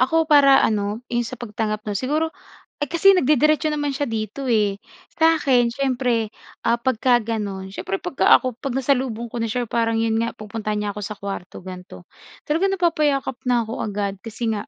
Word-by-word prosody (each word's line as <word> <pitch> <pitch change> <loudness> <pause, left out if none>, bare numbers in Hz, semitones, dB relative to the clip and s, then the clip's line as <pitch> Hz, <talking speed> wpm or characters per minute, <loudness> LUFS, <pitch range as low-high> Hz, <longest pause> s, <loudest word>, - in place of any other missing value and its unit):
ako 320 +5 +3
para 280 -2 +7
ano 210 0 -1
'yong 240 0 0
sa 255 - -6
pagtanggap 215 -1 -3
'no. - - -1
Siguro, 300 +7 0 0.5
eh, 290 - 0
kasi 345 +6 +5
nagde-diretso 305 0 +3
naman 290 -1 -1
siya 285 - 0
dito, 225 +4 -4
eh, 210 -4 +2 0.4
sakin 280 -7 +4
siyempre, 250 -4 0 0.4
ah, 235 - +3
pagka 245 0 +2
gano'n 205 -4 -4
siyempre 195 0 -4
'pag - - -6
ka - - +3
ako 255 -3 -4
'pag 275 - -3
nasalubong 250 -3 0
ko - - -6
na - - 0
s'ya 245 +3 -1
parang 230 -1 0
'yon 225 -1 +1
nga 230 0 -1
pupuntahan 215 0 -4
niya 205 -1 -2
ako - - -4
sa 210 - -4
kuwarto 195 -2 -7
ganito 180 - -10 0.4
talagang 355 +6 +1
napapayakap 300 -7 +1
na 245 -1 +3
ako 225 +1 -6
agad 200 -1 -3
kasi 225 +1 -4
nga 205 -1 -3
235 Hz, 185 wpm, -22 LUFS, 215-275 Hz, 0.5 s, para